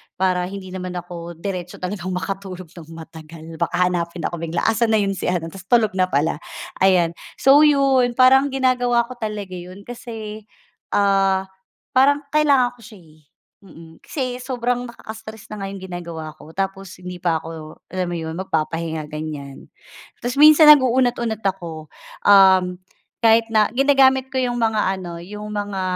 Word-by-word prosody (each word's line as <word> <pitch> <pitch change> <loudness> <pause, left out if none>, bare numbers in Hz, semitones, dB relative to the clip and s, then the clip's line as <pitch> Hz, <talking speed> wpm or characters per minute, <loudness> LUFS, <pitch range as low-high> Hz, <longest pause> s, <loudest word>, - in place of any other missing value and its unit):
para 180 -1 0
hindi 190 -1 -8
naman 185 -1 -6
ako 175 -1 -7
diretso 180 0 -5
talagang 185 -1 -4
makatulog 185 -2 -6
ng 165 -4 -12
matagal. 160 0 -11
Baka 170 +1 -1 0.2
hanapin 170 -1 -3
ako 170 - -3
bigla, 165 0 -3
"Asan 225 0 +2
na 215 - +3
'yon 195 - 0
si 190 - -4
ano?" 170 -2 -2
ta's 195 +1 -12
tulog 230 -4 +3
na 185 - +3
pala, 155 -1 0 0.4
ayan. 180 -3 +4 0.2
So 275 +2 +5
yun, 275 -5 +4
parang 265 +2 +6
ginagawa 245 -2 +2
ko 255 - -9
talaga 210 -4 -5
'yon 185 +2 -9
kasi, 220 -3 -8 0.5
ah, 195 -1 +2 0.5
parang 285 +3 +3
kailangan 285 -5 +3
ko - - -19
siya, 215 - -13
eh, 155 -1 -21 0.5
mm. 165 -2 -14
Kasi 255 -4 -3
sobrang 245 -1 -2
nakaka-stress 220 -2 -10
na 215 - -7
nga - - -4
yung 195 - -9
ginagawa 170 -3 -7
ko, 160 - -14
tapos 195 0 -4
hindi 180 0 -7
pa 170 -3 0
ako, 160 -1 -10
alam 185 -1 -2
mo 175 - -3
'yon, 160 +1 -5
magpapahinga, 160 -3 -3
ganyan. 150 -3 -7 0.6
Ta's 245 +3 -3
minsan 305 +1 +8
nag-uunat-unat 245 -5 +4
ako, 170 -5 -4 0.4
um, 190 -2 +6 0.4
kahit 225 0 +4
na 215 -1 +4
ginagamit 265 0 +4
ko 265 - -4
yung 245 -1 -1
mga 220 -1 +1 0.2
ano, 170 -2 -7
yung 210 +3 -8
mga, 205 -2 -3
195 Hz, 160 wpm, -21 LUFS, 175-240 Hz, 0.6 s, minsan